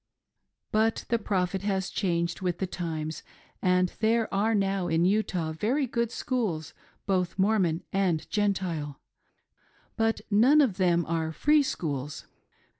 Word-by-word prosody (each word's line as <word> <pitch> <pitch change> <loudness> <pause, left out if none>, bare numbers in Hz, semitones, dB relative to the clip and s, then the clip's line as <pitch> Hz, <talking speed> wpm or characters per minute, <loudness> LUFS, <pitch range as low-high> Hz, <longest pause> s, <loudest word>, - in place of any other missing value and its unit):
But 220 +1 +1
the 235 - +2
Prophet, 190 -3 -1
has 195 -2 -1
changed 170 -3 -1
with 180 -2 -1
the 190 - -1
times, 160 -3 -4 0.4
and 180 -1 +2
there 225 +1 +1
are 215 +3 +2
now 195 -2 0
in 165 +1 +2
Utah 185 -5 0
very 235 - 0
good 235 -2 -1
schools, 205 - -2 0.3
both 185 -3 0
Mormon 190 -5 +2
and 185 -5 +1
Gentile, 180 -9 -1 1.0
but 225 0 +1
none 250 +9 +6
of 245 -11 +3
them 175 -3 +2
are 160 -1 -1
//r^ 295 - +3
schools. 145 - -4
190 Hz, 130 wpm, -28 LUFS, 170-220 Hz, 1.0 s, none